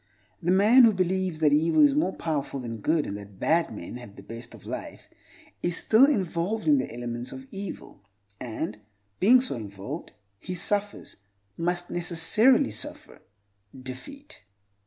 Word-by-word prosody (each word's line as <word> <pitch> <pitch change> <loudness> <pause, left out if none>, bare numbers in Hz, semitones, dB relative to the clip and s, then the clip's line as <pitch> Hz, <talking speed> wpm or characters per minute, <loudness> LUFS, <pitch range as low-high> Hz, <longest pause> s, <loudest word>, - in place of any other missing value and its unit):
The 175 - -2
man 215 +7 +6
who 225 - +5
believes 185 -3 -1
that 150 -2 +4
evil 165 - +4
is 285 - +3
more 285 -10 0
powerful 145 -4 -3
than 115 -2 -5
good, 155 +7 +1
and 100 - -5
that 100 -1 -12
bad 165 +1 +2
men 105 +2 -7
have 120 -5 -12
the - - -12
best 115 +1 -9
of - - -16
life, - - -7 0.5
is 175 0 -1
still 235 +5 +5
involved 200 - -1
in 290 -2 +5
the - - -3
elements 120 +1 -5
of 130 0 -9
evil; 195 -1 -8 0.4
and, 120 +2 -5 0.4
being 245 +6 +6
so 260 - -1
involved, 105 - -7 0.3
he 185 - -5
suffers—must 175 - -3
necessarily 175 - +3
suffer—defeat. 130 - -10
165 Hz, 145 wpm, -26 LUFS, -, 0.5 s, man